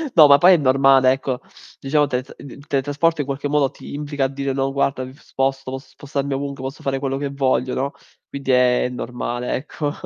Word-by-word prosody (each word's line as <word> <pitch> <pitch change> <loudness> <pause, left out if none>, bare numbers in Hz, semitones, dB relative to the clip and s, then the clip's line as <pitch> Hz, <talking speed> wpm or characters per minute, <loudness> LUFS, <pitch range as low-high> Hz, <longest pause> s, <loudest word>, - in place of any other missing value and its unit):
No, 155 -3 +9
ma 140 0 +8
poi 180 +5 +7
è - - +5
normale, 135 -1 +4
ecco. 130 -1 -2 0.4
Diciamo 145 +2 +2
teletr 130 0 -4
il 140 +1 -12
teletrasporto 145 +3 0
in - - -4
qualche 140 +1 -3
modo 145 -2 +1
ti - - -11
implica 145 -2 -2
a - - +2
dire: 140 0 -3
"No 135 0 -1
guarda 135 -1 0
mi 130 +1 -9
sposto, 135 -1 -3
posso 135 0 -7
spostarmi 140 0 -4
ovunque, 140 0 -4
posso 135 +2 -6
fare 135 -1 -1
quello 135 -1 -2
che 140 0 -3
voglio", 130 -2 0
no, 140 +2 -1 0.4
quindi 135 -1 -3
è 125 0 +3
normale, 125 0 -4
ecco. 145 +1 -3
135 Hz, 205 wpm, -21 LUFS, 130-145 Hz, 0.4 s, No